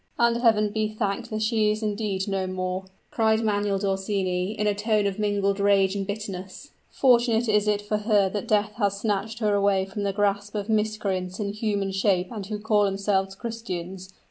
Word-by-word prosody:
"And 235 Hz, 0 st, +3 dB
Heaven 215 Hz, -3 st, +3 dB
be 215 Hz, 0 st, 0 dB
thanked 215 Hz, +2 st, -3 dB
that 215 Hz, -1 st, -2 dB
she 215 Hz, -1 st, +2 dB
is 215 Hz, +1 st, -1 dB
indeed 205 Hz, -2 st, -2 dB
no 195 Hz, -1 st, -1 dB
more!" 185 Hz, 0 st, -3 dB, 0.3 s
cried 220 Hz, 0 st, +2 dB
Manuel 205 Hz, -2 st, +1 dB
d'Orsini, 190 Hz, -1 st, -1 dB
in 210 Hz, -1 st, -2 dB
a 210 Hz, -, +3 dB
tone 210 Hz, 0 st, +1 dB
of 200 Hz, 0 st, -2 dB
mingled 200 Hz, -1 st, 0 dB
rage 200 Hz, -1 st, +3 dB
and 195 Hz, -1 st, -3 dB
bitterness. 200 Hz, +4 st, -6 dB, 0.2 s
"Fortunate 240 Hz, -2 st, +3 dB
is 210 Hz, -1 st, +2 dB
it 205 Hz, 0 st, +1 dB
for 210 Hz, +1 st, -1 dB
her 210 Hz, -2 st, +3 dB
that 205 Hz, 0 st, -4 dB
death 210 Hz, 0 st, +2 dB
has 200 Hz, -3 st, 0 dB
snatched 215 Hz, +1 st, -2 dB
her 215 Hz, -3 st, +1 dB
away 200 Hz, -1 st, +2 dB
from 195 Hz, +2 st, -6 dB
the 200 Hz, -1 st, 0 dB
grasp 205 Hz, +1 st, -1 dB
of 205 Hz, +1 st, -3 dB
miscreants 210 Hz, -4 st, -1 dB
in 200 Hz, -1 st, -2 dB
human 205 Hz, -2 st, -1 dB
shape 190 Hz, -2 st, +1 dB
and 205 Hz, -5 st, -6 dB
who 210 Hz, 0 st, -3 dB
call 210 Hz, -1 st, +2 dB
themselves 195 Hz, -1 st, 0 dB
Christians. 190 Hz, -5 st, -6 dB
205 Hz, 190 wpm, -25 LUFS, 195-215 Hz, 0.3 s, And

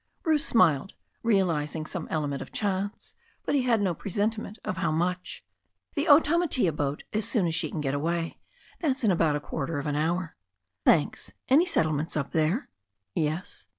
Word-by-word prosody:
Bruce 315 Hz, -3 st, +2 dB
smiled, 180 Hz, -, +3 dB, 0.3 s
realizing 165 Hz, -8 st, +1 dB
some 170 Hz, 0 st, -5 dB
element 145 Hz, -3 st, -2 dB
of -, -, -8 dB
chance. 200 Hz, 0 st, -3 dB, 0.3 s
But -, -, -1 dB
be 280 Hz, -, +3 dB
had 240 Hz, -4 st, +2 dB
no 190 Hz, -3 st, +1 dB
presentiment 210 Hz, +4 st, -2 dB
of 185 Hz, -, -2 dB
how 185 Hz, -, 0 dB
much. 180 Hz, +3 st, -2 dB, 0.5 s
"The 290 Hz, 0 st, 0 dB
Otamatea 295 Hz, -, +4 dB
boat, 145 Hz, -1 st, -2 dB
as 215 Hz, 0 st, 0 dB
soon 210 Hz, -7 st, +2 dB
as 165 Hz, -, 0 dB
she 160 Hz, -, 0 dB
can 155 Hz, -, -4 dB
get 135 Hz, -2 st, -1 dB
away. 165 Hz, +3 st, -2 dB, 0.4 s
That's 275 Hz, -6 st, 0 dB
in 215 Hz, -, +4 dB
about 165 Hz, -4 st, +2 dB
a -, -, 0 dB
quarter 155 Hz, +1 st, -4 dB
of 145 Hz, -, -3 dB
an 145 Hz, -1 st, -1 dB
hour." 165 Hz, +3 st, -1 dB, 0.5 s
"Thanks. 155 Hz, -3 st, +2 dB, 0.2 s
Any 305 Hz, +7 st, +5 dB
settlements 155 Hz, -, +1 dB
up 140 Hz, -2 st, -2 dB
there?" 165 Hz, -, +1 dB, 0.4 s
"Yes." 160 Hz, +5 st, -3 dB
175 Hz, 170 wpm, -27 LUFS, 155-220 Hz, 0.5 s, Any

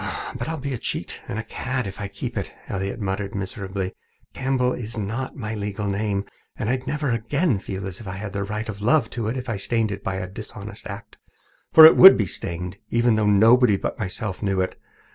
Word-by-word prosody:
"But -, -, -4 dB
I'll 160 Hz, -, -2 dB
be 140 Hz, -1 st, -4 dB
a 120 Hz, -, -4 dB
cheat -, -, -4 dB
and 100 Hz, -, -4 dB
a 110 Hz, -, -2 dB
cad 125 Hz, +2 st, -3 dB
if 100 Hz, +1 st, -7 dB
I 100 Hz, -, -2 dB
keep 115 Hz, +5 st, -6 dB
it," 100 Hz, -, -3 dB, 0.2 s
Elliott 100 Hz, +3 st, -3 dB
muttered 100 Hz, -1 st, -3 dB
miserably. 95 Hz, -1 st, -4 dB, 0.4 s
"Campbell 130 Hz, -1 st, +1 dB
isn't 115 Hz, +2 st, -4 dB
my 110 Hz, -5 st, -4 dB
legal 105 Hz, -1 st, -3 dB
name, 100 Hz, 0 st, -1 dB, 0.3 s
and 110 Hz, -, -1 dB
I'd 130 Hz, 0 st, -2 dB
never 150 Hz, -3 st, -1 dB
again 120 Hz, -, +1 dB
feel 95 Hz, 0 st, -5 dB
as 95 Hz, -2 st, -6 dB
if 110 Hz, -, -10 dB
I 95 Hz, -, -4 dB
had 100 Hz, +1 st, -6 dB
even 100 Hz, 0 st, -2 dB
the 100 Hz, -, -7 dB
right 105 Hz, +1 st, -3 dB
of 105 Hz, -2 st, -6 dB
love 120 Hz, +1 st, +3 dB
to 115 Hz, -3 st, -3 dB
it 120 Hz, +4 st, -2 dB
if 130 Hz, 0 st, -5 dB
I 110 Hz, -4 st, -2 dB
stained 110 Hz, +2 st, 0 dB
it 100 Hz, 0 st, -6 dB
by 95 Hz, -, -2 dB
a 95 Hz, 0 st, -3 dB
dishonest 95 Hz, -, -8 dB
act. -, -, -9 dB, 0.5 s
For 160 Hz, -, +11 dB
it 160 Hz, -, +10 dB
would 190 Hz, -, +11 dB
be 105 Hz, -, +1 dB
stained, 90 Hz, +1 st, -5 dB
even 120 Hz, 0 st, +3 dB
though 110 Hz, -1 st, +2 dB
nobody 110 Hz, +2 st, +6 dB
but -, -, -4 dB
myself 95 Hz, -1 st, -4 dB
knew 100 Hz, -2 st, 0 dB
it. 95 Hz, -, 0 dB
105 Hz, 220 wpm, -23 LUFS, 100-120 Hz, 0.5 s, For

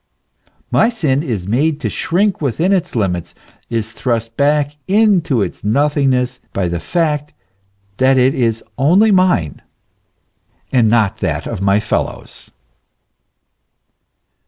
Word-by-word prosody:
My 225 Hz, -, +4 dB
sin 155 Hz, -, 0 dB
is 115 Hz, -, -3 dB
made 145 Hz, +9 st, 0 dB
to -, -, -1 dB
shrink 190 Hz, +3 st, 0 dB
within 160 Hz, -, +1 dB
its 180 Hz, -6 st, -1 dB
limits, 90 Hz, -6 st, -2 dB, 0.3 s
is 115 Hz, -1 st, -3 dB
thrust 115 Hz, -2 st, -2 dB
back 145 Hz, 0 st, +1 dB
into 190 Hz, -, +2 dB
its -, -, -7 dB
nothing 140 Hz, +6 st, +1 dB
ness, 125 Hz, 0 st, -1 dB
by 95 Hz, -2 st, -1 dB
the 85 Hz, 0 st, -3 dB
fact 150 Hz, -, -1 dB, 0.6 s
that 130 Hz, +1 st, +3 dB
it 130 Hz, +1 st, +3 dB
is 115 Hz, -3 st, -1 dB, 0.2 s
only 185 Hz, +11 st, +4 dB
mine, 185 Hz, -, +1 dB, 1.1 s
and 120 Hz, -4 st, +3 dB
not 110 Hz, -3 st, +2 dB
that -, -, -2 dB
of -, -, -5 dB
my 100 Hz, +1 st, +3 dB
fellows. 105 Hz, -, -4 dB
135 Hz, 125 wpm, -16 LUFS, 115-160 Hz, 1.1 s, My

